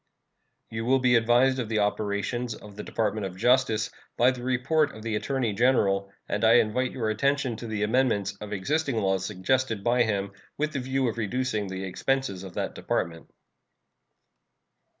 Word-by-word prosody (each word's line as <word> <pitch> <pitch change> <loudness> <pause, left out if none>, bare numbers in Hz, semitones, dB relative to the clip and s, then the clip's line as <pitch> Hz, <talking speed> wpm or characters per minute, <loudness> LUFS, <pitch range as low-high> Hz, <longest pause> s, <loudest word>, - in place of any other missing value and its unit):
You 110 0 -3
will 130 +2 +4
be 125 -1 +3
advised 120 +3 +4
of 115 -4 -3
the 110 - 0
operations 105 +3 -1
of 105 -2 -13
the 105 - -6
Department 110 -1 -1
of 90 -1 -10
Justice 120 -1 +2 0.3
by 125 +2 +5
the 125 -2 -7
report 130 +4 +1
of 110 - -10
the 110 -1 -2
Attorney 125 -1 -1
General, 100 -4 +2 0.2
and 105 - -2
I 110 0 +6
invite 120 +2 +3
your 110 -4 -1
attention 140 +2 0
to 120 - -7
the 105 -1 -2
amendments 105 -4 +1
of 105 0 -7
existing 135 +8 -1
laws 95 -3 +1
suggested 115 +2 0
by 120 +2 +3
him, 100 -3 0 0.3
with 155 +2 -1
the 140 - -1
view 130 0 0
of 115 0 -3
reducing 110 -1 -1
the 95 0 -5
expenses 110 +1 -1
of 95 -2 -9
that - - -2
Department. 85 -1 -3
115 Hz, 170 wpm, -27 LUFS, 105-130 Hz, 0.3 s, I